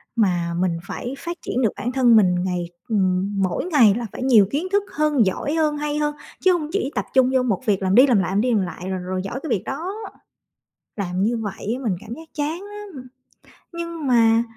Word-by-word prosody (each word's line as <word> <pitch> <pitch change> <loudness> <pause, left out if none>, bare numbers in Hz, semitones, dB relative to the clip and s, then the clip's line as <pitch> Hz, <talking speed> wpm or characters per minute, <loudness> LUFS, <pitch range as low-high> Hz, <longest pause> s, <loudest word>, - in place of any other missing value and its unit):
mà 175 -6 +1
mình 180 -2 +1
phải 245 - -5
phát 340 +4 -5
triển 255 - -2
được 225 - +2
bản 245 - -2
thân 250 -3 +4
mình 185 -5 +5
ngày 180 -2 -2 0.2
ừm, 195 -1 +1
mỗi 185 - -1
ngày 270 - +5
là 235 +1 -3
phải - - -6
nhiều 235 -6 +6
kiến 310 +6 -1
thức 405 0 +2
hơn, 300 -6 +3
giỏi 190 +10 -1
hơn, 305 -2 +1
hay 295 0 -2
hơn. 295 0 0 0.3
Chứ 375 - +5
hông 310 -4 -2
chỉ 395 -7 -1
tập - - -1
trung 260 -1 +5
vô 260 -1 +3
1 210 -7 0
việc 200 -4 +1
làm 190 +1 +2
đi 255 +4 +8
làm 245 -5 +4
lại, 185 -1 -1
làm 200 +2 +2
đi 250 +2 +1
làm 210 - +3
lại 180 +1 -6
rồi 190 -1 -2
rồi 185 +1 -3
giỏi 195 +7 -4
cái 320 - -4
việc 200 -6 0
đó, 330 +8 -4 1.0
làm 185 -2 -2
như 230 +3 +1
vậy 215 0 -4
á 270 - -8
mình 210 -6 0
cảm 220 - -8
giác 320 +4 -11
chán 310 +4 -2
lắm! 405 -10 -9 0.7
Nhưng 335 -2 -5
mà 230 -2 +4
240 Hz, 230 wpm, -22 LUFS, 195-295 Hz, 1.0 s, đi